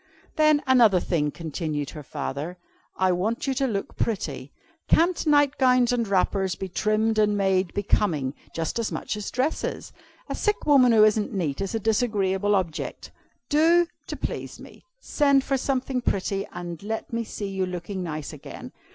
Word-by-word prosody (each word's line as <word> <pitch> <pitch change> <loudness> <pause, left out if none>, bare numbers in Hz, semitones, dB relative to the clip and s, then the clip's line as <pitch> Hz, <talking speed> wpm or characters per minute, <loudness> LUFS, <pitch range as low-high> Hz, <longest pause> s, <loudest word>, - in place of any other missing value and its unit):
"'Then, 305 -2 +4
another 235 -8 +5
thing,' 155 -4 0
continued 155 -2 -4
her 150 - -8
father, 150 +5 -5 0.4
'I 185 0 +3
want 205 +7 -1
you 270 - 0
to 270 +1 0
look 200 -5 -3
pretty. 145 - -3 0.4
Can't 345 0 +2
nightgowns 265 -4 +4
and 235 -2 0
wrappers 190 -1 +1
be 190 - -5
trimmed 215 +3 +1
and 210 -1 +3
made 190 -2 +1
becoming 165 -9 0 0.2
just 165 +7 -3
as 230 - -2
much - - -3
as 210 -1 -5
dresses? 265 +5 -2 0.3
A - - -3
sick 420 -1 -1
woman 270 -5 +6
who 220 -2 +6
isn't 215 0 +2
neat 160 -4 -2
is 195 +3 -2
a - - 0
disagreeable 205 -3 +1
object. 175 -5 -3 0.4
Do, 330 +5 +4 0.2
to - - -4
please - - -5
me, - - -14 0.2
send 280 - +2
for 275 - 0
something 265 -1 -1
pretty, 195 -2 -1
and 175 -2 -7
let 220 +3 -5
me 230 0 0
see 205 -2 -5
you 190 -1 -2
looking 180 +2 -5
nice 155 -4 -5
again. - - -9
205 Hz, 165 wpm, -25 LUFS, 180-250 Hz, 0.4 s, woman